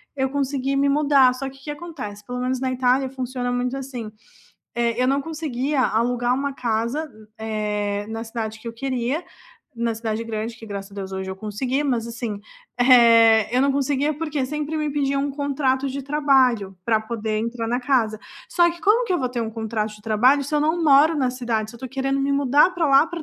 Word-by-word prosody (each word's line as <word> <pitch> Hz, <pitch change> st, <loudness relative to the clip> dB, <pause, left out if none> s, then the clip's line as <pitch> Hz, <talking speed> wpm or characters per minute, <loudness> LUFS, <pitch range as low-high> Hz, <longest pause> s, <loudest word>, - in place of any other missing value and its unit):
eu 265 Hz, -1 st, 0 dB
conseguir 275 Hz, -1 st, -1 dB
me 280 Hz, +1 st, +3 dB
mudar, 280 Hz, -3 st, +4 dB
só 270 Hz, +1 st, -5 dB
que, 270 Hz, -, -15 dB
que 270 Hz, -, -19 dB
que 295 Hz, -, -3 dB
acontece, 280 Hz, -11 st, -8 dB
pelo 250 Hz, +2 st, -5 dB
menos 255 Hz, 0 st, -1 dB
na 260 Hz, -1 st, 0 dB
Itália 255 Hz, +1 st, +2 dB
funciona 255 Hz, -1 st, -3 dB
muito 245 Hz, +1 st, -1 dB
assim, 255 Hz, -5 st, -6 dB, 0.6 s
eh, 235 Hz, 0 st, 0 dB
eu -, -, +3 dB
não 275 Hz, +1 st, +2 dB
conseguia 295 Hz, -3 st, -2 dB, 0.2 s
alugar 245 Hz, +1 st, 0 dB
uma 280 Hz, +2 st, -2 dB
casa 230 Hz, +5 st, 0 dB
m 220 Hz, -8 st, -16 dB
eh, 210 Hz, -2 st, -2 dB
na 225 Hz, -, -4 dB
cidade 225 Hz, -1 st, -4 dB
que 235 Hz, -, -14 dB
eu -, -, -6 dB
queria, 260 Hz, +1 st, -1 dB, 0.7 s
na 230 Hz, -, +1 dB
cidade 225 Hz, -1 st, -2 dB
grande 220 Hz, +1 st, -3 dB
que, 225 Hz, -, -10 dB
graças 200 Hz, 0 st, -6 dB
a -, -, -12 dB
Deus, 190 Hz, -1 st, -6 dB
hoje 190 Hz, 0 st, -4 dB
eu 190 Hz, -, -6 dB
consegui, 250 Hz, +6 st, -1 dB
mas, 240 Hz, -5 st, 0 dB
assim, 230 Hz, -1 st, -4 dB, 0.5 s
eh, 230 Hz, -3 st, +6 dB
eu -, -, +4 dB
não 280 Hz, -, +3 dB
conseguia, 280 Hz, +2 st, 0 dB
porque 305 Hz, -2 st, -2 dB, 0.2 s
sempre 300 Hz, +1 st, -3 dB
me 305 Hz, -1 st, -1 dB
pediam 275 Hz, -1 st, +1 dB
um -, -, -3 dB
contrato 275 Hz, -1 st, 0 dB
de 280 Hz, -, -3 dB
trabalho 265 Hz, -8 st, +3 dB, 0.2 s
pra 225 Hz, -2 st, +3 dB
poder 220 Hz, -2 st, -2 dB
entrar 230 Hz, 0 st, -3 dB
na 250 Hz, -, 0 dB
casa, 220 Hz, -4 st, +2 dB, 0.4 s
só 350 Hz, -, +5 dB
que 340 Hz, 0 st, -10 dB
como 425 Hz, +8 st, +3 dB
que 390 Hz, -, -2 dB
eu 355 Hz, -, +2 dB
vou 255 Hz, -, 0 dB
ter 235 Hz, -, 0 dB
um 220 Hz, -, -4 dB
contrato 220 Hz, -1 st, -2 dB
de 210 Hz, -, -19 dB
trabalho 250 Hz, +7 st, +4 dB
se 295 Hz, +3 st, -4 dB
eu -, -, +2 dB
não 330 Hz, +2 st, 0 dB
moro 300 Hz, +4 st, +6 dB
na 250 Hz, -, +1 dB
cidade, 225 Hz, -3 st, -1 dB
se 235 Hz, -, -12 dB
eu -, -, -19 dB
tô -, -, -5 dB
querendo 270 Hz, +1 st, 0 dB
me 280 Hz, +1 st, 0 dB
mudar 280 Hz, +4 st, +4 dB
pra 340 Hz, -3 st, +1 dB
lá 275 Hz, +3 st, +6 dB
pra 340 Hz, -1 st, -6 dB
255 Hz, 220 wpm, -23 LUFS, 225-280 Hz, 0.7 s, eh